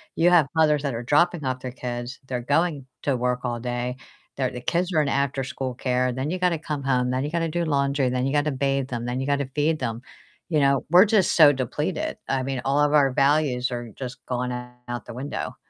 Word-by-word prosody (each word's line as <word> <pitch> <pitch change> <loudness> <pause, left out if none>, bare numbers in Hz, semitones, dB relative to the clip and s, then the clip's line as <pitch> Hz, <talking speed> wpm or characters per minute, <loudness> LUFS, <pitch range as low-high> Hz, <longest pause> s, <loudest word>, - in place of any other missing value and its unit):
You 170 +2 +4
have 165 -6 +5
mothers 150 -2 +3
that 140 -3 -1
are 115 +1 -4
dropping 155 +3 +2
off 130 0 -2
their 125 - -5
kids, 120 0 -5
they're 125 -2 -3
going 145 +1 0 0.2
to 140 -2 +1
work 125 0 -1
all 120 -1 -2
day, 125 0 -3 0.4
their 130 -2 0
the 125 - -6
kids 175 +8 -1
are 155 - +4
in 145 - 0
afterschool 135 -2 -2
care, 125 0 0
then 130 +4 -3
you 185 - -1
gotta 175 -3 +1
come 150 -3 -4
home, 125 -2 +1
then 130 +1 0
you 150 - -3
gotta 165 -1 0
do 170 +2 -1
laundry, 140 -3 +1
then 125 0 -1
you 135 - -1
gotta 145 0 +2
bathe 135 0 -1
them, 120 -1 -4
then 125 +2 -2
you 135 - -3
gotta 140 -2 0
feed 155 +1 +1
them. 115 -2 -3 0.5
You 155 -3 +2
know, 140 -1 +2
we're 180 +5 +7
just 205 -4 +3
so 150 -3 +8
depleted. 130 -3 -2
I 130 -1 0
mean, 135 -2 -3
all 140 +2 +2
of 145 0 +3
our 140 -3 +5
values 135 -3 +2
are 120 -1 -4
just 130 -1 -6
going 125 0 -2
out 125 0 -7
the - - -8
window. 135 +4 -5
135 Hz, 230 wpm, -24 LUFS, 125-150 Hz, 0.5 s, so